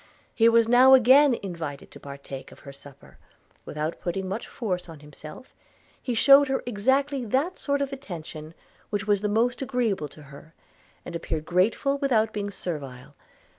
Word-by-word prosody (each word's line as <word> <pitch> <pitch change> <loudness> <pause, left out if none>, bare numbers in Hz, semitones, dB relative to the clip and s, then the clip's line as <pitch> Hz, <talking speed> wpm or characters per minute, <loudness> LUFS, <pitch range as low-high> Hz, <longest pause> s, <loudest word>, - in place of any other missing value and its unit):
He 230 -1 +4
was 230 -1 +4
now 255 +3 +7
again 260 +2 +5
invited 165 -7 -7
to - - -13
partake 140 -1 -10
of - - -16
her 140 - -11
supper: 140 0 -16 0.5
without 155 +2 -4
putting 190 +2 -3
much 195 +5 -5
force 180 -7 -4
on 160 -3 -12
himself, 150 - -13 0.5
he 245 - -3
shewed 280 +4 +6
her 265 0 -2
exactly 265 +5 0
that 270 - -1
sort 280 -1 -1
of 275 0 -5
attention 165 - -9 0.3
which 205 -1 -3
was 205 -2 +1
the 210 - -1
most 235 +5 0
agreeable 240 - -1
to 150 +2 -16
her, 145 +3 -15 0.5
and 175 - -7
appeared 160 -2 -4
grateful 220 +11 +1
without 225 -6 +1
being 205 -1 -3
servile. 145 -10 -7
205 Hz, 165 wpm, -25 LUFS, 155-255 Hz, 0.5 s, now